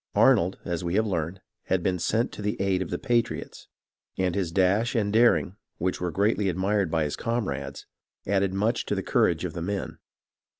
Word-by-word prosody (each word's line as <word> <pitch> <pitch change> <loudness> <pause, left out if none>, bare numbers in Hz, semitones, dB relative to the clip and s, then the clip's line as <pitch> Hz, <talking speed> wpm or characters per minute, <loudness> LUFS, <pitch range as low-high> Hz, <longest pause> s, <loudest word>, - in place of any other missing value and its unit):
Arnold, 90 +3 +4
as 85 0 -2
we 85 +1 -1
have 110 +1 +3
learned, 90 -2 -2 0.2
had 95 -2 0
been 90 -1 0
sent 115 +7 0
to - - -8
the 105 0 -2
aid 95 -1 +1
of 90 - -3
the - - -2
patriots, 120 -3 -1 0.5
and 95 -2 +1
his 90 -4 -1
dash 100 +7 +2
and 105 -3 +1
daring, 110 -4 +3 0.2
which 90 +1 -2
were 90 - 0
greatly 100 +2 +1
admired 95 +1 0
by 80 0 +1
his 75 - -2
comrades, 115 -3 -3 0.4
added 100 -1 +1
much 105 +5 0
to - - 0
the - - -2
courage - - +2
of - - -4
the 85 - -5
men. 100 +3 -4
95 Hz, 195 wpm, -26 LUFS, 90-105 Hz, 0.5 s, Arnold